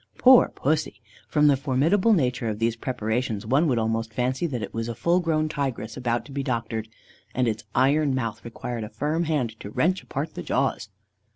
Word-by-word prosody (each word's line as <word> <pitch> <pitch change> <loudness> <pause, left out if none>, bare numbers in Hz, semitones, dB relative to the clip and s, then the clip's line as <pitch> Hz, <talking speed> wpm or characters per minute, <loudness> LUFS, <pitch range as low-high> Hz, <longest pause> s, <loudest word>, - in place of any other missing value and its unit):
Poor 255 -1 +7
Pussy! 155 +2 -1 0.3
From 150 -1 +2
the 145 -2 +6
formidable 150 - +2
nature 125 - +1
of 105 - -3
these 115 +1 0
preparations, 115 -2 -2
one 135 +8 +3
would 125 -5 +1
almost 115 0 -1
fancy 130 +6 0
that 125 -7 -3
it - - -6
was 115 +1 -3
a 115 - -4
full 170 +9 +2
grown 155 -3 +1
tigress 130 -7 -3
about 120 -2 -1
to - - -12
be 140 0 -2
doctored, 115 -3 -2 0.5
and 125 -1 +2
its 110 -1 -2
iron 140 +1 +3
mouth 115 -4 -3
required 115 0 -5
a 105 - -6
firm 150 +9 -1
hand 125 -8 -1
to 100 - -7
wrench 180 - +1
apart 140 +4 -4
the - - -6
jaws. 125 -4 -1
130 Hz, 195 wpm, -25 LUFS, 115-150 Hz, 0.5 s, Poor